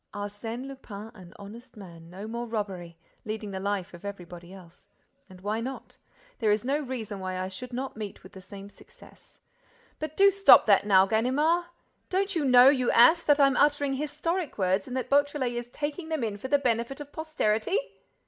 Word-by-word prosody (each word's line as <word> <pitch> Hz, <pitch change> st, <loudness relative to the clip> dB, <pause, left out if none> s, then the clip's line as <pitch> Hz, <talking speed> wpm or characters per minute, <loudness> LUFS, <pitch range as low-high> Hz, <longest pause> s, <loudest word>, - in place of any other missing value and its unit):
—Arsène 205 Hz, +5 st, -6 dB
Lupin 225 Hz, -6 st, -9 dB
an 185 Hz, -4 st, -14 dB
honest 225 Hz, +4 st, -12 dB
man—no 180 Hz, +1 st, -10 dB
more 235 Hz, +2 st, -5 dB
robbery—leading 200 Hz, 0 st, -6 dB
the 190 Hz, -, -5 dB
life 200 Hz, -1 st, -3 dB
of 175 Hz, -, -12 dB
everybody 175 Hz, -3 st, -9 dB
else.—And 185 Hz, +4 st, -18 dB
why 210 Hz, +3 st, -2 dB
not? 260 Hz, +3 st, -7 dB, 0.4 s
There 220 Hz, -3 st, +1 dB
is 210 Hz, +2 st, 0 dB
no 280 Hz, +3 st, 0 dB
reason 240 Hz, -8 st, -5 dB
why 185 Hz, -1 st, -4 dB
I 185 Hz, 0 st, -3 dB
should 215 Hz, +7 st, -9 dB
not 260 Hz, +2 st, -5 dB
meet 210 Hz, -2 st, -8 dB
with 185 Hz, -, -14 dB
the 190 Hz, -, -12 dB
same 195 Hz, +2 st, -11 dB
success.—But 310 Hz, -, -14 dB
do 395 Hz, 0 st, +6 dB
stop 395 Hz, 0 st, +7 dB
that 205 Hz, -1 st, +4 dB
now, 190 Hz, -2 st, +6 dB
Ganimard! 275 Hz, -, +1 dB, 0.4 s
Don't 390 Hz, +1 st, -1 dB
you 325 Hz, -, 0 dB
know, 250 Hz, -1 st, +7 dB
you 260 Hz, -3 st, +3 dB
ass, 320 Hz, +9 st, +6 dB
that 295 Hz, -3 st, +3 dB
I'm 275 Hz, -2 st, +4 dB
uttering 290 Hz, -1 st, +2 dB
historic 300 Hz, +4 st, -3 dB
words 190 Hz, 0 st, 0 dB
and 255 Hz, 0 st, -4 dB
that 260 Hz, -, -3 dB
Beautrelet 285 Hz, -2 st, +1 dB
is 240 Hz, 0 st, -5 dB
taking 300 Hz, +5 st, -5 dB
them 315 Hz, -6 st, -2 dB
in 210 Hz, -3 st, -3 dB
for 260 Hz, -, -5 dB
the 285 Hz, +2 st, +3 dB
benefit 245 Hz, 0 st, -1 dB
of 290 Hz, -1 st, -9 dB
posterity?" 310 Hz, -, -1 dB
235 Hz, 175 wpm, -27 LUFS, 200-285 Hz, 0.4 s, stop